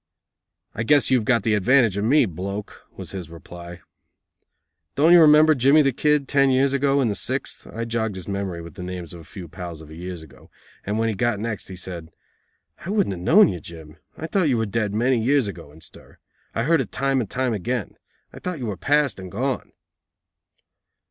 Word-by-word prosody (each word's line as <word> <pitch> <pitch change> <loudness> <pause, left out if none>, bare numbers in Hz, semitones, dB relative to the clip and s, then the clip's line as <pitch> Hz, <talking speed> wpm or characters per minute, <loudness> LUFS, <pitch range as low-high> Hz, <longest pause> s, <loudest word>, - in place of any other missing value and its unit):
"I - - -4
guess 140 +4 +3
you've 125 -4 +3
got 115 -4 +2
the 110 - +1
advantage 115 0 +3
of 100 - -2
me, 135 +5 +4
bloke," 100 +3 -7
was - - -8
his 90 -5 -7
reply. 85 +1 -11 1.1
"Don't 160 +5 +5
you 175 - +8
remember 155 0 +7
Jimmy 140 +3 +4
the 135 - +2
Kid, 150 +2 +1
ten 140 -1 +3
years 135 +1 +2
ago, 140 0 +2
in 125 - +2
the 105 - 0
sixth?" - - -4
I 115 +1 -5
jogged 110 -3 -2
his 95 - -8
memory 100 -4 -4
with 85 - -11
the 95 - -10
names 90 -2 -6
of 85 - -10
a - - -13
few 90 +2 -10
pals 85 -1 -8
of 80 -1 -13
years 85 +1 -7
ago, 70 -5 -17 0.4
and 105 +1 -1
when 115 0 +1
he 110 - 0
got 120 0 0
next, 110 -1 -4
he 95 - -8
said: 90 -3 -7 0.7
"I 170 - -6
wouldn't 200 - +1
have 90 - -7
known 195 - +6
you, 90 - -4
Jim. 80 -1 -12 0.2
I 160 - -5
thought 170 -1 +1
you 125 - +2
were 110 - 0
dead 105 0 -1
many 120 +2 +1
years 135 -1 +2
ago 85 -7 -8
in 80 +2 -17
stir. - - -13 0.4
I 115 - 0
heard 160 +2 +3
it 115 - -6
time 135 -1 0
and 110 - -5
time 130 -2 -1
again. 120 +5 -3 0.4
I - - -10
thought 180 -2 -4
you 130 - -5
were 105 -4 -4
past 145 - +1
and 95 -1 -9
gone." 130 +6 -3
110 Hz, 215 wpm, -23 LUFS, 90-135 Hz, 1.1 s, you